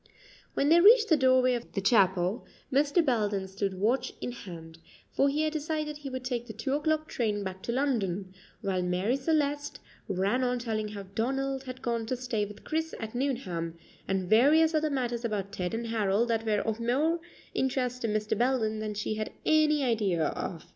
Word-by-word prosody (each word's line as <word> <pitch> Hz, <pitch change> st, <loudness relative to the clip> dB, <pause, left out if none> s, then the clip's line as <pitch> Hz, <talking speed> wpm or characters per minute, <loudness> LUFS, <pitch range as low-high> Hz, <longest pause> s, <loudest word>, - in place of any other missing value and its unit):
When 285 Hz, -, +2 dB
they 340 Hz, +2 st, +7 dB
reached 440 Hz, +3 st, +7 dB
the 320 Hz, -, +6 dB
doorway 255 Hz, -2 st, +4 dB
of 240 Hz, -1 st, -5 dB
the -, -, -1 dB
chapel, 190 Hz, -1 st, +3 dB, 0.3 s
Mr. 290 Hz, +4 st, +3 dB
Belden 205 Hz, -6 st, 0 dB
stood 195 Hz, 0 st, -3 dB
watch 220 Hz, +8 st, 0 dB
in -, -, -4 dB
hand, 165 Hz, -8 st, -10 dB, 0.3 s
for 275 Hz, -, +3 dB
he 300 Hz, +2 st, 0 dB
had 310 Hz, 0 st, 0 dB
decided 305 Hz, -1 st, -2 dB
he 290 Hz, -2 st, -7 dB
would 260 Hz, -1 st, -5 dB
take 240 Hz, -2 st, -2 dB
the 220 Hz, -, -7 dB
two 225 Hz, +5 st, -2 dB
o'clock 310 Hz, +1 st, 0 dB
train 210 Hz, -4 st, -1 dB
back 190 Hz, -1 st, -6 dB
to 235 Hz, -, -3 dB
London, 205 Hz, -8 st, -1 dB, 0.3 s
while 190 Hz, -2 st, 0 dB
Marie 180 Hz, +7 st, 0 dB
Celeste 290 Hz, 0 st, 0 dB, 0.3 s
ran 200 Hz, +6 st, +1 dB
on 250 Hz, 0 st, +1 dB
telling 220 Hz, -3 st, -2 dB
how 205 Hz, -1 st, -7 dB
Donald 265 Hz, +7 st, -2 dB
had 255 Hz, 0 st, -8 dB
gone 230 Hz, -2 st, -1 dB
to 255 Hz, -, -1 dB
stay 235 Hz, -4 st, -1 dB
with 210 Hz, +1 st, -12 dB
Chris 320 Hz, +1 st, -2 dB
at 220 Hz, -1 st, -6 dB
Nuneham, 195 Hz, -11 st, -2 dB, 0.3 s
and 190 Hz, -1 st, -1 dB
various 300 Hz, -, +5 dB
other 310 Hz, 0 st, +2 dB
matters 245 Hz, -4 st, -2 dB
about 205 Hz, -4 st, -2 dB
Ted 180 Hz, -4 st, -3 dB
and 230 Hz, +1 st, -3 dB
Harold 225 Hz, 0 st, +1 dB
that 225 Hz, -1 st, 0 dB
were 210 Hz, -1 st, +2 dB
of 220 Hz, 0 st, -2 dB
more 285 Hz, +9 st, +1 dB, 0.3 s
interest 250 Hz, -1 st, -1 dB
to 230 Hz, -, 0 dB
Mr. 210 Hz, 0 st, 0 dB
Belden 235 Hz, -3 st, +1 dB
than 215 Hz, -1 st, -4 dB
she 215 Hz, +1 st, -2 dB
had 215 Hz, 0 st, -3 dB
any 305 Hz, -2 st, +4 dB
idea 210 Hz, -9 st, +1 dB
of. 165 Hz, -3 st, -5 dB
235 Hz, 190 wpm, -29 LUFS, 205-275 Hz, 0.3 s, they